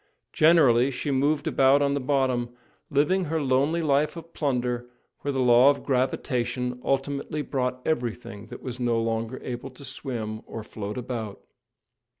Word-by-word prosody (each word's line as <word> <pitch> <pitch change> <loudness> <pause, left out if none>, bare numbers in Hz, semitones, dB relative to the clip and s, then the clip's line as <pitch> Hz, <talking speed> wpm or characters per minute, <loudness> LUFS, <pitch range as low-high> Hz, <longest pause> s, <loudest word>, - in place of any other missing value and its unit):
Generally, 140 -6 +5
she 140 +2 -3
moved 145 +3 +1
about 140 -3 +4
on 140 -1 +2
the 140 - 0
bottom, 130 -3 0 0.4
living 155 +6 +2
her 160 +1 -1
lonely 145 +4 +1
life 150 +2 +1
of 165 0 -10
plunder 125 -4 -1 0.3
where 145 - -2
the 135 - -2
law 125 +1 +6
of 145 - 0
gravitation 125 -1 -1
ultimately 140 +2 -1
brought 125 -2 -2
everything 120 -6 -3
that - - -10
was 125 -1 -5
no 120 -2 +1
longer 115 +2 -2
able 125 +2 -5
to 135 +2 -12
swim 120 -5 -5
or 110 - -6
float 105 0 -6
about. 115 -5 -5
130 Hz, 150 wpm, -26 LUFS, 120-145 Hz, 0.4 s, law